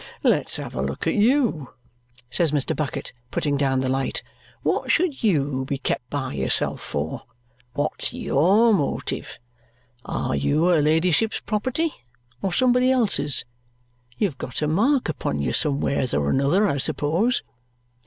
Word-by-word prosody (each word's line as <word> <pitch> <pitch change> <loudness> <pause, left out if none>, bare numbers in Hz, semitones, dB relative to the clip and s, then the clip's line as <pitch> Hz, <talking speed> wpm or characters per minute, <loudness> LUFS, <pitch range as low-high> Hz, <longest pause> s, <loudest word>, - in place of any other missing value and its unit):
Let's - - +2
have - - -6
a - - -2
look - - -3
at - - +1
YOU," 220 - +1 0.6
says 165 0 +2
Mr. 145 -3 +1
Bucket, 150 -3 -4 0.2
putting 145 +2 -1
down 135 -2 +1
the 130 - -1
light. 135 +1 -1 0.4
"What - - 0
should 330 -5 +1
YOU 145 -9 +1
be 140 +1 -2
kept 125 -2 -3
by 135 -3 -3
yourself 65 -1 +1
for? 75 +2 -4 0.5
What's 145 +1 -1
YOUR 200 +11 +3
motive? 150 -8 -2 0.7
Are 65 - -2
you 105 - +1
her 175 -3 +4
ladyship's 165 +8 +2
property, 260 +9 -1 0.5
or 195 - -1
somebody 250 +5 +3
else's? 220 - +1 0.7
You've 185 -11 -1
got 130 +4 -4
a - - +1
mark 240 - +2
upon 105 - -2
you 70 - -1
somewheres 140 -3 +1
or 70 0 +1
another, 155 +10 +3
I 140 - 0
suppose?" 170 - +1
155 Hz, 145 wpm, -23 LUFS, 135-215 Hz, 0.7 s, her